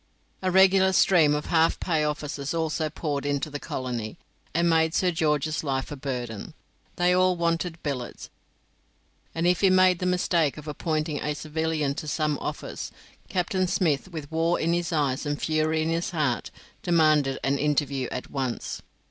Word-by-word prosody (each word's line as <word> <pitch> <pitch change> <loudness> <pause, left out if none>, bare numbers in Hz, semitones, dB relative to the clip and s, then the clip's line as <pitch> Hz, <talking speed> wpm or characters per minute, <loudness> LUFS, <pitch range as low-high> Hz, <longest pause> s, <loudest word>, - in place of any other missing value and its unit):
A 185 - 0
regular 190 0 +5
stream 160 -6 +5
of 150 - -3
half 165 -1 +2
pay 160 -4 0
officers 150 0 -3
also 160 -1 -1
poured 145 -3 -3
into 145 +1 -1
the 145 - -4
colony, 120 -6 -4 0.3
and 170 +2 +1
made 160 -1 +3
Sir 180 -1 +2
George's 155 -1 0
life 135 -2 -2
a - - -4
burden. 125 -6 -5 0.4
They 180 0 +3
all 185 0 +3
wanted 170 0 -1
billets, 135 -5 -5 1.0
and 165 +1 0
if 180 0 +3
he 195 - +5
made 185 -1 +5
the 180 - -1
mistake 175 -5 +1
of 150 0 -9
appointing 155 0 -2
a 150 0 -2
civilian 155 -1 -1
to 155 - -6
some 150 -1 0
office, - - -5 0.4
Captain 185 +1 0
Smith, 175 -5 +1
with 155 -3 -7
war 165 +2 +1
in 165 +1 +1
his 175 0 -1
eye 145 -5 +1
and 145 -1 -2
fury 155 0 +1
in 160 - -1
his 165 +1 -1
heart, 150 -8 -1 0.3
demanded 155 -6 +3
an 140 +1 +1
interview 140 -3 0
at 125 - -5
once. 130 -4 -3
155 Hz, 165 wpm, -26 LUFS, 145-170 Hz, 1.0 s, regular